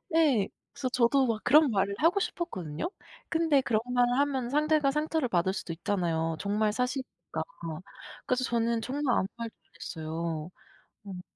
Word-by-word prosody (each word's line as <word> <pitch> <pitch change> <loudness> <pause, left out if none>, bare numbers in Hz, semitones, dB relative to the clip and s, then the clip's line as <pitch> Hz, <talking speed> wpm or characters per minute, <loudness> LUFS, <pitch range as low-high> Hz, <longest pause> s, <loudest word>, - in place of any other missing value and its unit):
예. 270 -12 +4 0.2
그래서 265 - -3
저도 255 +2 +3
막 220 -2 -1
그런 300 +2 +6
말을 200 0 +1
하고 345 +5 +3
싶었거든요. 180 - -3 0.4
근데 320 -4 +3
그런 225 -4 +1
말을 245 0 +3
하면 265 -4 +1
상대가 300 0 +3
상처를 305 -1 0
받을 185 -1 +1
수도 175 -3 -4
있잖아요. 165 -3 -1
정말 210 +2 +1
사실이니까. 255 +3 -3 0.8
그래서 255 0 +1
저는 230 -1 +1
정말 270 +1 0
아무 190 - +1
말도 230 -1 -5
안 155 - -37
했어요. 160 0 -4 0.6
음. 185 -2 -6
235 Hz, 335 characters per minute, -29 LUFS, 190-280 Hz, 0.8 s, 그런